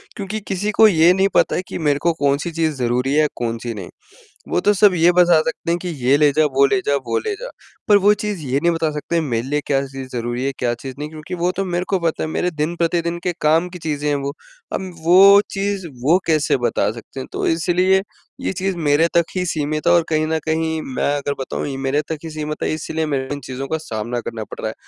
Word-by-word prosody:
क्योंकि 205 Hz, +2 st, -4 dB
किसी 200 Hz, +2 st, -1 dB
को 220 Hz, +1 st, +6 dB
ये 170 Hz, -3 st, +5 dB
नहीं 190 Hz, +1 st, +3 dB
पता -, -, +3 dB
है -, -, 0 dB
कि -, -, -5 dB
मेरे 145 Hz, -3 st, +1 dB
को 170 Hz, +1 st, +2 dB
कौन-सी 145 Hz, +4 st, +1 dB
चीज़ 160 Hz, -2 st, -1 dB
ज़रूरी 125 Hz, +1 st, 0 dB
है 155 Hz, 0 st, +4 dB
कौन-सी 115 Hz, 0 st, -3 dB
नहीं। 105 Hz, -, -8 dB, 0.6 s
वो -, -, +1 dB
तो 205 Hz, -, +3 dB
सब 200 Hz, -1 st, +5 dB
ये 170 Hz, +1 st, +5 dB
बता 175 Hz, -2 st, +5 dB
सकते 160 Hz, +1 st, -3 dB
हैं 170 Hz, -, +1 dB
कि 180 Hz, -, -6 dB, 0.2 s
ये 135 Hz, -, +5 dB
ले 145 Hz, -1 st, +4 dB
जा, 155 Hz, +2 st, +3 dB
वो 140 Hz, -1 st, +3 dB
ले 195 Hz, +8 st, +2 dB
जा 145 Hz, -, +2 dB
वो 115 Hz, 0 st, 0 dB
ले -, -, -3 dB
जा। -, -, -5 dB, 0.4 s
पर 205 Hz, -, +7 dB
वो 205 Hz, +1 st, +6 dB
चीज़ 210 Hz, -2 st, -4 dB
ये 135 Hz, +1 st, 0 dB
नहीं 170 Hz, +3 st, +2 dB
बता 165 Hz, -1 st, 0 dB
सकते 150 Hz, +3 st, -4 dB
हैं 165 Hz, -, +3 dB
मेरे 120 Hz, -4 st, -2 dB
लिए 145 Hz, +2 st, 0 dB
क्या 135 Hz, -1 st, +1 dB
चीज़ 135 Hz, -1 st, -8 dB
ज़रूरी 120 Hz, +2 st, -2 dB
है 140 Hz, -, 0 dB
क्या 120 Hz, -1 st, 0 dB
चीज़ 130 Hz, +2 st, -8 dB
नहीं 150 Hz, -, -4 dB
क्योंकि 155 Hz, +3 st, -7 dB
वो 175 Hz, +1 st, 0 dB
तो 195 Hz, -, 0 dB
मेरे 175 Hz, 0 st, -2 dB
को 190 Hz, -2 st, +1 dB
पता 165 Hz, -2 st, -1 dB
है -, -, -2 dB
मेरे 180 Hz, +3 st, -1 dB
दिन-प्रतिदिन 170 Hz, +2 st, -1 dB
के 180 Hz, -, 0 dB
काम 160 Hz, +4 st, +3 dB
की 180 Hz, 0 st, -9 dB
चीज़ें 150 Hz, -2 st, -3 dB
हैं 145 Hz, -, +1 dB
वो। 140 Hz, +1 st, -3 dB, 0.4 s
अब 190 Hz, -1 st, -3 dB
वो 195 Hz, +4 st, +7 dB
चीज़ 195 Hz, -1 st, -2 dB, 0.2 s
वो 160 Hz, +7 st, +5 dB
कैसे 155 Hz, -3 st, +2 dB
बता 120 Hz, -4 st, 0 dB
सकते 115 Hz, +3 st, -10 dB
हैं 130 Hz, -, -6 dB
तो -, -, -2 dB
इसलिए 180 Hz, +3 st, +2 dB, 0.4 s
ये -, -, -1 dB
चीज़ 190 Hz, 0 st, -2 dB
मेरे 155 Hz, 0 st, +3 dB
तक 170 Hz, -, +4 dB
ही 180 Hz, -1 st, 0 dB
सीमित 155 Hz, -2 st, -2 dB
है। -, -, +6 dB
और 170 Hz, -, +4 dB
कहीं 155 Hz, -1 st, +1 dB
न 160 Hz, 0 st, 0 dB
कहीं 160 Hz, 0 st, -1 dB
मैं 145 Hz, -, +1 dB
अगर 145 Hz, 0 st, -2 dB
बताऊँ 135 Hz, -, -3 dB
ये 135 Hz, -2 st, -4 dB
मेरे 135 Hz, +2 st, 0 dB
तक 160 Hz, -, -2 dB
ही 165 Hz, -, -6 dB
सीमित 155 Hz, -1 st, -5 dB
है -, -, 0 dB
इसलिए 160 Hz, 0 st, -3 dB
मेरे 135 Hz, -3 st, -2 dB
इन 145 Hz, -, -5 dB
चीज़ों 130 Hz, +1 st, -5 dB
का 160 Hz, -, -1 dB
सामना 120 Hz, -5 st, -4 dB
करना 115 Hz, -1 st, -5 dB
पड़ -, -, -11 dB
रहा 110 Hz, -, -2 dB
है। -, -, -6 dB
160 Hz, 255 wpm, -20 LUFS, 140-175 Hz, 0.6 s, पर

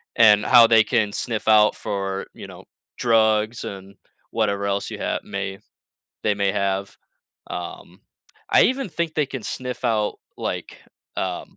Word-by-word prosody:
and 105 Hz, -2 st, +6 dB
how 120 Hz, -2 st, +8 dB
they 115 Hz, -1 st, +6 dB
can 110 Hz, -3 st, 0 dB
sniff 115 Hz, -4 st, -2 dB
out 105 Hz, -1 st, +5 dB
for, 95 Hz, -1 st, -3 dB
you -, -, -10 dB
know, -, -, -13 dB, 0.3 s
drugs 110 Hz, -1 st, +2 dB
and 100 Hz, 0 st, -9 dB, 0.3 s
whatever 100 Hz, -3 st, 0 dB
else 100 Hz, 0 st, -1 dB
you -, -, -5 dB
have -, -, -2 dB
may 100 Hz, 0 st, -5 dB, 0.6 s
they 105 Hz, -, +2 dB
may 100 Hz, -1 st, 0 dB
have, 100 Hz, -1 st, -2 dB, 0.5 s
um 90 Hz, -1 st, -8 dB, 0.5 s
I -, -, +6 dB
even 260 Hz, -1 st, 0 dB
think 170 Hz, -2 st, -3 dB
they 150 Hz, -2 st, +1 dB
can 130 Hz, -3 st, -6 dB
sniff 125 Hz, +2 st, -5 dB
out, 105 Hz, -2 st, 0 dB, 0.2 s
like, -, -, -5 dB, 0.4 s
um, 90 Hz, -2 st, -4 dB
105 Hz, 150 wpm, -22 LUFS, 100-115 Hz, 0.6 s, how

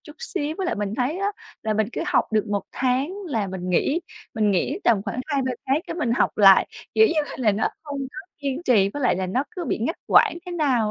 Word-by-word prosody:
chút 300 Hz, +1 st, -13 dB
xíu. 335 Hz, -11 st, -3 dB
Với 380 Hz, -, -1 dB
lại 350 Hz, -, 0 dB
mình 205 Hz, 0 st, -3 dB
thấy 265 Hz, +8 st, -1 dB
á, 400 Hz, +1 st, 0 dB, 0.3 s
là 220 Hz, -1 st, 0 dB
mình 215 Hz, 0 st, +1 dB
cứ -, -, -3 dB
học -, -, +1 dB
được 215 Hz, 0 st, +2 dB
1 205 Hz, -2 st, -1 dB
tháng 265 Hz, +7 st, 0 dB
là 225 Hz, -, -1 dB
mình 185 Hz, -1 st, -5 dB
nghỉ, 280 Hz, -, +2 dB, 0.3 s
mình 215 Hz, -2 st, +2 dB
nghỉ 255 Hz, -, 0 dB
tầm 220 Hz, -5 st, +3 dB
khoảng 220 Hz, +4 st, -4 dB
2-3 270 Hz, -4 st, 0 dB
tháng 270 Hz, +3 st, +2 dB
cái -, -, -4 dB
mình 295 Hz, -9 st, 0 dB
học -, -, +1 dB
lại. 195 Hz, -2 st, +7 dB, 0.3 s
Kiểu 440 Hz, -, +7 dB
như 325 Hz, -5 st, +1 dB
là -, -, -7 dB
là 220 Hz, -5 st, +3 dB
nó 215 Hz, -, +1 dB
không 290 Hz, -3 st, -6 dB
có 385 Hz, +5 st, -9 dB
kiên 280 Hz, +2 st, -3 dB
trì, 215 Hz, -, +4 dB
với 280 Hz, +7 st, -5 dB
lại 250 Hz, -, +3 dB
là 190 Hz, 0 st, -2 dB
nó 250 Hz, +9 st, 0 dB
cứ 370 Hz, -5 st, -5 dB
bị -, -, -1 dB
ngắt 275 Hz, +10 st, -2 dB
quãng -, -, +5 dB
thế 355 Hz, -, -5 dB
nào 260 Hz, -10 st, +1 dB
255 Hz, 255 wpm, -24 LUFS, 210-310 Hz, 0.3 s, lại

